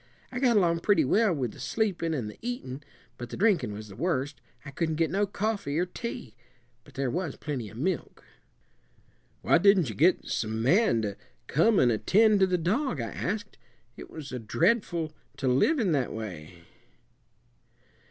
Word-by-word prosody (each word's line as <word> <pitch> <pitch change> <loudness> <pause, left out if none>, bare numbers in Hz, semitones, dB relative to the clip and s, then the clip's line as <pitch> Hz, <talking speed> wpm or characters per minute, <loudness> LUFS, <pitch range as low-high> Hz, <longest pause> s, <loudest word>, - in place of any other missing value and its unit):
I 250 - -3
got 245 -4 +3
along 170 -4 +3
pretty 165 -4 +3
well 215 - +3
with 130 -8 -2
the - - -14
sleepin' 195 -7 -1
and 120 -7 -3
the 105 - -10
eatin', 220 - -5 0.4
but 120 0 -6
the - - -7
drinkin' 195 - +2
was 105 +1 -7
the 100 - -12
worst. 145 - -2 0.2
I 140 - -7
couldn' 160 +2 -1
get 165 +1 0
no 200 +2 +1
coffee 200 -7 -2
or 175 - +2
tea; 185 - -7 0.5
but - - -19
there 135 -2 -1
was 170 -4 -3
plenty 130 -8 -5
of 110 - -12
milk." 175 +6 -3 1.2
"Why - - +4
didn't 190 - +4
you 110 - -6
get 170 - +3
some 110 0 -2
man 140 - +3
to 100 -1 -3 0.3
come 200 +9 +3
and 125 -6 +4
attend 210 - +4
to 190 - +5
the 180 -1 +1
dog?" 185 - 0
I 115 -1 -3
asked. 205 +2 -4 0.4
"It - - -10
was 150 -3 -8 0.2
dreadful 170 - +1 0.2
to 135 - -2
live 135 - +3
in 215 -9 +1
that 135 -5 0
way." 85 -6 -8
165 Hz, 175 wpm, -28 LUFS, 125-205 Hz, 1.2 s, to